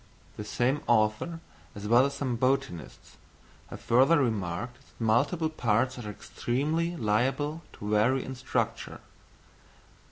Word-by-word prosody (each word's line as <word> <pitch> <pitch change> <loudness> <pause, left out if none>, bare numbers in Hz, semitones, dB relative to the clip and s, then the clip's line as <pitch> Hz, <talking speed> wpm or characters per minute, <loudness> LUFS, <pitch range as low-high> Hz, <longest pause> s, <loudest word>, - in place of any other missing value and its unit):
The 105 - -6
same 125 +6 0
author 115 +9 +1 0.3
as 100 0 -6
well 120 +4 +5
as 140 - -6
some 130 -4 -2
botanists, 130 -7 -2 0.5
have - - -9
further 135 +8 +4
remarked 110 -2 -1
that 135 - -25
multiple 140 +9 +2
parts 125 -1 +1
are 105 -3 -6
extremely 150 - -2
liable 135 +6 0
to 105 +1 -6
vary 115 +5 +3
in 135 - -5
structure. 130 0 -3
125 Hz, 125 wpm, -28 LUFS, 110-140 Hz, 0.5 s, well